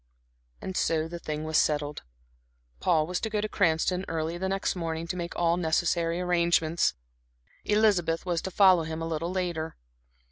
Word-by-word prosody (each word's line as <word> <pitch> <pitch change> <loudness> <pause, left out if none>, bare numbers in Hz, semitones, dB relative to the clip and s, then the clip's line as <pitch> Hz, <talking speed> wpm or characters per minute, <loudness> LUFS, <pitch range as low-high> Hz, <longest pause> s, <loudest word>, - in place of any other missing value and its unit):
And 190 - -5
so 160 -3 +1
the 170 +1 -7
thing 155 -1 -4
was 155 0 +2
settled. 145 -1 0 0.8
Paul 155 -3 +2
was 180 +2 -2
to 220 - -3
go 210 -1 -1
to 210 - -1
Cranston 180 -1 +1
early 165 0 -2
the 190 +2 -2
next 195 0 -1
morning 165 -2 -3
to 175 - -4
make 175 -1 -5
all 170 0 +2
necessary 170 0 +1
arrangements; 170 - +2 0.7
Elizabeth 195 -6 +2
was 175 -2 0
to - - -4
follow 185 -2 +5
him 160 0 -4
a - - -2
little 165 +2 -2
later. 175 -4 -3
170 Hz, 170 wpm, -28 LUFS, 160-180 Hz, 0.8 s, follow